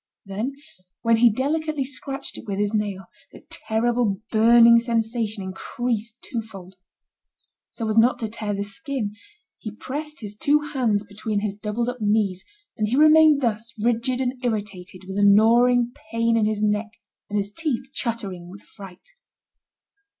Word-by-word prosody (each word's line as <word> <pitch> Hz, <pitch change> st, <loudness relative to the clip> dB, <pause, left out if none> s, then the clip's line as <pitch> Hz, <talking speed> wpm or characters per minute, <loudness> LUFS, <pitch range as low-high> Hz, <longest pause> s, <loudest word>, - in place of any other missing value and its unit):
Then, 210 Hz, +7 st, -3 dB, 0.5 s
when 230 Hz, 0 st, +4 dB
he 235 Hz, +1 st, +6 dB
delicately 295 Hz, +4 st, -1 dB
scratched 275 Hz, 0 st, -6 dB
it -, -, -10 dB
with 195 Hz, -1 st, -3 dB
his 205 Hz, +1 st, 0 dB
nail, 205 Hz, -3 st, -2 dB, 0.3 s
the -, -, -15 dB
terrible 225 Hz, -2 st, 0 dB
burning 235 Hz, +1 st, +7 dB
sensation 225 Hz, -3 st, -2 dB
increased 220 Hz, +4 st, -3 dB
twofold. 210 Hz, -6 st, -7 dB, 1.0 s
So 225 Hz, -, -4 dB
as 220 Hz, +1 st, +3 dB
not 240 Hz, +3 st, +4 dB
to 225 Hz, -, -3 dB
tear 210 Hz, -1 st, -4 dB
the 200 Hz, -, -2 dB
skin, 220 Hz, +1 st, -4 dB, 0.5 s
he 215 Hz, -, -6 dB
pressed 295 Hz, +8 st, -6 dB
his 210 Hz, -1 st, -7 dB
two 290 Hz, +7 st, +3 dB
hands 225 Hz, -6 st, +1 dB
between 205 Hz, 0 st, -3 dB
his 210 Hz, -2 st, -2 dB
doubled 210 Hz, +3 st, -3 dB
up 245 Hz, -1 st, -4 dB
knees, 205 Hz, -3 st, +1 dB, 0.3 s
and 215 Hz, -, -1 dB
he 235 Hz, -, 0 dB
remained 310 Hz, 0 st, +6 dB
thus, 230 Hz, -1 st, -2 dB
rigid 240 Hz, +3 st, 0 dB
and 255 Hz, 0 st, -3 dB
irritated, 200 Hz, -5 st, -4 dB
with 190 Hz, +1 st, -7 dB
the 205 Hz, -, +2 dB
gnawing 235 Hz, +4 st, +5 dB, 0.2 s
pain 230 Hz, 0 st, +1 dB
in 225 Hz, -2 st, +2 dB
his 215 Hz, 0 st, -1 dB
neck, 210 Hz, +1 st, 0 dB, 0.4 s
and 210 Hz, -, -2 dB
his 200 Hz, 0 st, -2 dB
teeth 270 Hz, -2 st, -3 dB
chattering 200 Hz, -7 st, -4 dB
with 195 Hz, +3 st, -12 dB
fright. 195 Hz, -, -14 dB
225 Hz, 155 wpm, -23 LUFS, 205-245 Hz, 1.0 s, burning